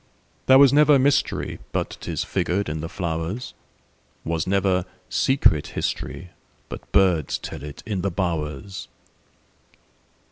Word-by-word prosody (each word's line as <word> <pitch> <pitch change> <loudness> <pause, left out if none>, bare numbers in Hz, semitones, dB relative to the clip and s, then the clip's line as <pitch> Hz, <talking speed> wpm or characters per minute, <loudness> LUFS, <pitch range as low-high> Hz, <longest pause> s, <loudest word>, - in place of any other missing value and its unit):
There 130 - +8
was 140 -1 +7
never 150 0 +6
mysteryBut 140 +2 -1
'tis - - -3
figured 95 0 -1
in 75 0 -3
the 80 - -5
flowers; 85 +6 -4 0.7
SWas 80 0 -1
never 95 -2 +1 0.2
secret 130 - +2
historyBut 90 0 -6
birds 90 -7 +3
tell - - -8
it 75 0 -9
in 100 -4 -2
the 100 - 0
bowers. 85 0 -3
90 Hz, 110 wpm, -23 LUFS, 80-105 Hz, 0.7 s, There